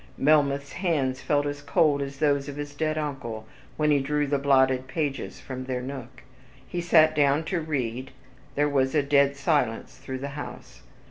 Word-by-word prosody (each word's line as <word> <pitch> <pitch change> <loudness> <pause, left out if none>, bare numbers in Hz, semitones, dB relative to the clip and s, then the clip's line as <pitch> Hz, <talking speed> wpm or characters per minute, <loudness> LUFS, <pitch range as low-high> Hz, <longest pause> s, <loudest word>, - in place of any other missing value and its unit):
Melmoth's 140 -1 +2
hands 145 -8 -1
felt 145 -1 +1
as 145 0 -4
cold 145 0 +2
as 140 0 -5
those 140 -1 +1
of 140 - -6
his 145 0 -6
dead 155 +1 -1
uncle, 135 -8 -4 0.3
when 150 -1 +2
he 145 - +4
drew 150 +2 0
the 140 0 0
blotted 130 -2 +3
pages 140 0 -3
from 130 -1 -7
their 130 -1 -2
nook. 130 -2 -8 0.4
He 175 - -3
sat 160 -2 +5
down 145 +1 +3
to 170 +1 -2
read, 130 -4 -3 0.5
there 145 +1 +2
was 135 -1 +1
a 150 - +3
dead 140 0 +3
silence 140 -6 0
through 130 -1 -5
the 140 +2 -5
house. 145 +1 -9
140 Hz, 180 wpm, -26 LUFS, 130-150 Hz, 0.5 s, sat